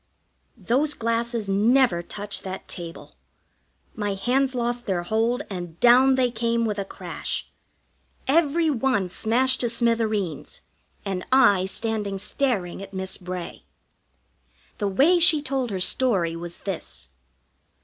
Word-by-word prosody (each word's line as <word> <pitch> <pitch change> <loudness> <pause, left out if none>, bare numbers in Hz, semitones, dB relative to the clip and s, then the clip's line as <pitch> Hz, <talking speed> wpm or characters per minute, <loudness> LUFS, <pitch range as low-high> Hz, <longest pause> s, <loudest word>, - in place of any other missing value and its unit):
Those 260 +9 +1
glasses 230 -1 -1
never 210 -1 +3
touched 205 +3 -5
that 190 0 -6
table. 170 -1 -8 0.8
My 205 -2 -2
hands 255 +6 +1
lost 240 0 -2
their 180 -3 0
hold, 225 +8 0
and 175 -4 -7
down 255 +2 +6
they 255 -2 +2
came 230 0 0
with 210 -2 -2
a 200 - -2
crash. - - -5 0.8
Every 325 +3 +3
one 235 -8 0
smashed 245 +7 +1
to 240 - +1
smithereens, 220 - -1 0.4
and 190 -2 -3
I 205 -8 +5
standing 210 -1 -1
staring 200 -5 -1
at 195 0 -10
Miss 190 0 -2
Bray. 180 -1 -7 1.1
The 205 - 0
way 285 - +4
she 325 -2 +5
told 270 -3 -2
her 195 -3 -3
story 185 -5 +2
was 170 0 -7
this. 165 - -5
225 Hz, 130 wpm, -24 LUFS, 190-255 Hz, 1.1 s, down